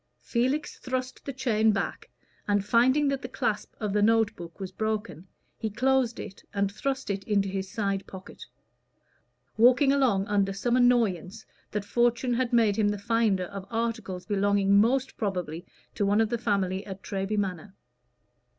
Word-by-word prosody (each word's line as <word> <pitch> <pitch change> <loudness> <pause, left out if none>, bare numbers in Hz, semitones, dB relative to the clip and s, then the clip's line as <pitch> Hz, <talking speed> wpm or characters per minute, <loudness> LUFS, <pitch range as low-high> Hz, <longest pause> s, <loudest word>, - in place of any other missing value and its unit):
Felix 260 +5 -1
thrust 255 0 -4
the 275 - -3
chain 220 -4 +2
back, 200 -1 -3 0.4
and 205 -1 +1
finding 260 +7 +3
that 275 -1 -1
the - - -5
clasp 220 -6 -2
of 210 -3 -2
the 210 - +2
note 225 0 +3
book 170 +1 -10
was 190 -1 -5
broken, 215 -3 -3 0.3
he 220 - -2
closed 255 +1 +1
it 195 -2 -9
and 200 0 +1
thrust 265 +2 -3
it 195 0 -3
into 200 -2 +1
his 190 0 -4
side 195 -2 -2
pocket, 190 -1 -10 1.1
walking 250 +4 +5
along 245 -9 +2
under 200 -1 +1
some 235 +5 0
annoyance 225 -5 +2 0.2
that 210 -1 -3
fortune 240 +3 +1
had 240 0 0
made 225 -4 +3
him 210 -2 +3
the 205 - -1
finder 210 -2 +1
of 195 +1 -8
articles 225 -5 -3
belonging 200 -1 +2
most 250 +6 +2
probably 180 -6 -3 0.3
to - - -1
one 200 +2 +3
of 225 -1 +2
the 235 - 0
family 195 -4 0
at 195 -1 -8
Treby 195 +2 -2
Manor. 190 -1 -3
210 Hz, 165 wpm, -27 LUFS, 195-240 Hz, 1.1 s, walking